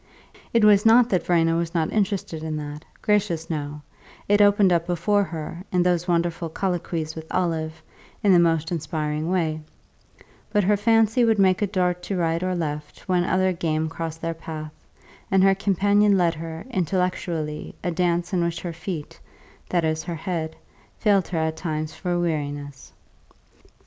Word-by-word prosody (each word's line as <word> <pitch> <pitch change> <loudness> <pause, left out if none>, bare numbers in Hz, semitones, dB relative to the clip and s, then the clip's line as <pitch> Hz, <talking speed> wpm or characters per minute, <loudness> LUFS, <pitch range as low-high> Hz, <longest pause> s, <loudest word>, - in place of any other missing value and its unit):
It 230 -2 +4
was 205 -1 +6
not 230 +2 +6
that 185 -6 +1
Verena 165 -2 +3
was 170 0 -3
not 160 -2 0
interested 195 -6 -1
in 155 -1 -3
that 150 0 -6 0.2
gracious, 190 -6 +1
no; 150 -1 -4 0.4
it 205 +1 +4
opened 205 -2 +5
up 170 0 +1
before 200 +4 +2
her, 165 +1 -6
in 180 -1 +3
those 175 0 +1
wonderful 170 -1 0
colloquies 170 -3 -2
with 160 0 -8
Olive, 160 -3 -1 0.4
in 205 - +5
the 175 - +6
most 165 -1 +2
inspiring 155 -1 -2
way; 160 -4 0 0.9
but 210 -1 +2
her 205 +3 +3
fancy 225 +3 +3
would 225 -2 +3
make 190 0 +3
a 205 - +2
dart 180 -2 0
to 190 +2 -3
right 165 -1 0
or 185 0 -1
left 150 -3 -4
when 180 -2 +2
other 185 +1 +2
game 160 -2 -1
crossed 165 0 -6
their 165 0 -1
path, 155 -1 -7 0.6
and 190 -1 +4
her 195 0 +6
companion 200 +1 +3
led 170 -2 +3
her, 165 0 -7
intellectually, 175 -5 -2
a 175 - 0
dance 175 +1 0
in 175 -2 +2
which 170 -1 -2
her 175 -2 -4
feet 165 -2 -6 0.5
that 175 -2 +1
is, 155 0 0
her 175 -2 -5
head 160 -1 -3 0.4
failed 200 -4 +2
her 175 - -3
at 160 0 -1
times 155 -2 -3
for 175 -2 -2
weariness. 145 -4 -3
170 Hz, 170 wpm, -24 LUFS, 160-190 Hz, 0.9 s, was